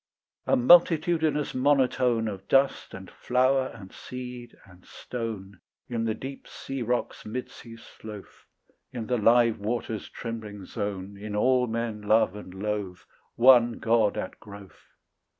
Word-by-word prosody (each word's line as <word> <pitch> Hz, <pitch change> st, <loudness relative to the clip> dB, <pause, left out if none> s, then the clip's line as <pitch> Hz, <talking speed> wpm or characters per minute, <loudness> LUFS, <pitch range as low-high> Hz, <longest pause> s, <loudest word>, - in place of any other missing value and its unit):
A -, -, +4 dB
multitudinous 160 Hz, +1 st, +4 dB
monotone 130 Hz, -4 st, +2 dB
Of 100 Hz, -2 st, -7 dB
dust 135 Hz, 0 st, +2 dB
and -, -, -10 dB
flower 130 Hz, +1 st, +1 dB
and 95 Hz, -6 st, -12 dB
seed 125 Hz, -1 st, -9 dB
and 90 Hz, -1 st, -19 dB
stone, 110 Hz, -5 st, -7 dB, 0.3 s
In 115 Hz, -2 st, -2 dB
the 110 Hz, -1 st, -1 dB
deep 135 Hz, +1 st, -8 dB
sea 135 Hz, -1 st, -6 dB
rock's 120 Hz, +1 st, -2 dB
mid 125 Hz, +4 st, -5 dB
sea 115 Hz, -1 st, -12 dB
sloth, 110 Hz, -2 st, -12 dB, 0.4 s
In 120 Hz, -4 st, -5 dB
the 125 Hz, +1 st, 0 dB
live 115 Hz, +1 st, +4 dB
water's 110 Hz, 0 st, -3 dB
trembling 110 Hz, -4 st, -7 dB
zone, 100 Hz, 0 st, -5 dB
In 105 Hz, 0 st, -5 dB
all 125 Hz, +3 st, +3 dB
men 115 Hz, -2 st, -3 dB
love 105 Hz, -1 st, +2 dB
and 105 Hz, -3 st, -9 dB
loathe, 100 Hz, -1 st, -4 dB, 0.4 s
One 120 Hz, -1 st, +6 dB
God 115 Hz, -2 st, +1 dB
at 95 Hz, -, -5 dB
growth. 100 Hz, -2 st, -14 dB
115 Hz, 135 wpm, -27 LUFS, 105-125 Hz, 0.4 s, One